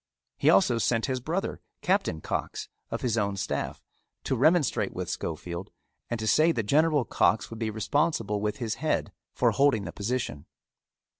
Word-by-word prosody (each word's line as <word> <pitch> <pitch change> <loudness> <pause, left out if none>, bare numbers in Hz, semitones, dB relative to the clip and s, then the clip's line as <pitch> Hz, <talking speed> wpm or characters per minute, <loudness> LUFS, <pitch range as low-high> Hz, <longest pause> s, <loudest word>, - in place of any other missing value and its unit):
He - - +4
also 115 +5 +4
sent 115 -1 +1
his 130 -2 -1
brother, 165 +10 -3 0.2
Captain 185 - +1
Cox, - - -3 0.2
of - - -3
his 115 -3 +1
own 100 -1 -1
staff, 100 0 -3 0.4
to - - 0
remonstrate 140 - +2
with 90 -1 -3
Schofield, 85 +1 -4 0.4
and 120 - -2
to 110 - -3
say 155 +9 +5
that 115 - -1
General 145 +3 +3
Cox 110 - +2
would 115 - -7
be 110 -1 -1
responsible 110 -1 0
with 105 0 -1
his 115 -3 -2
head - - 0 0.2
for - - +2
holding 135 -7 +3
the 85 - -5
position. 105 - -3
115 Hz, 165 wpm, -28 LUFS, 100-140 Hz, 0.4 s, say